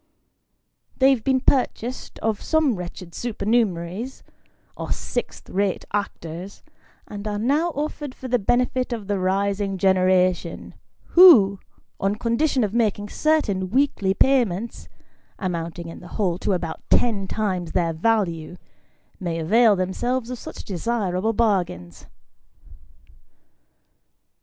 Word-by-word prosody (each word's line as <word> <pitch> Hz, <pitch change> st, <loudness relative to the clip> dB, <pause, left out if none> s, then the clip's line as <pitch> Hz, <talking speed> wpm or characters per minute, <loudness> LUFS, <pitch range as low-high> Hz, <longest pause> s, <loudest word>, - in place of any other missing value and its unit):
They 270 Hz, 0 st, +5 dB
have 250 Hz, -5 st, 0 dB
been 265 Hz, -1 st, +2 dB
purchased 255 Hz, -2 st, -1 dB
of 220 Hz, -2 st, 0 dB
some 315 Hz, -5 st, +2 dB
wretched 180 Hz, -1 st, -8 dB
supernumeraries, 215 Hz, -1 st, -1 dB, 0.5 s
or -, -, -6 dB
sixth -, -, -4 dB
rate 195 Hz, 0 st, -1 dB
actors, 185 Hz, -2 st, -5 dB, 0.4 s
and 205 Hz, +1 st, -7 dB
are 205 Hz, -1 st, -2 dB
now 285 Hz, +10 st, +1 dB
offered 295 Hz, -2 st, -4 dB
for 260 Hz, -, -8 dB
the 245 Hz, -1 st, +1 dB
benefit 250 Hz, +3 st, 0 dB
of 220 Hz, -4 st, -5 dB
the 200 Hz, -1 st, -1 dB
rising 195 Hz, +1 st, 0 dB
generation, 185 Hz, -2 st, +1 dB, 0.4 s
who, 235 Hz, -, +8 dB, 0.4 s
on 195 Hz, +1 st, 0 dB
condition 240 Hz, +4 st, +1 dB
of 205 Hz, -1 st, -2 dB
making 210 Hz, -3 st, 0 dB
certain 215 Hz, -13 st, +1 dB
weekly 215 Hz, -6 st, +1 dB
payments, 235 Hz, -5 st, +1 dB, 0.5 s
amounting 170 Hz, -3 st, -4 dB
in 165 Hz, -, -9 dB
the 175 Hz, -, -12 dB
whole 185 Hz, -5 st, 0 dB
to 200 Hz, -, 0 dB
about 170 Hz, -3 st, -3 dB
ten 210 Hz, -5 st, +2 dB
times 185 Hz, -6 st, -2 dB
their 170 Hz, -2 st, +1 dB
value, 175 Hz, -3 st, 0 dB, 0.6 s
may 170 Hz, -3 st, -3 dB
avail 215 Hz, +7 st, +4 dB
themselves 230 Hz, +7 st, -2 dB
of 250 Hz, -, -5 dB
such -, -, -8 dB
desirable 200 Hz, 0 st, -1 dB
bargains. 180 Hz, -, -1 dB
205 Hz, 120 wpm, -23 LUFS, 185-240 Hz, 0.6 s, who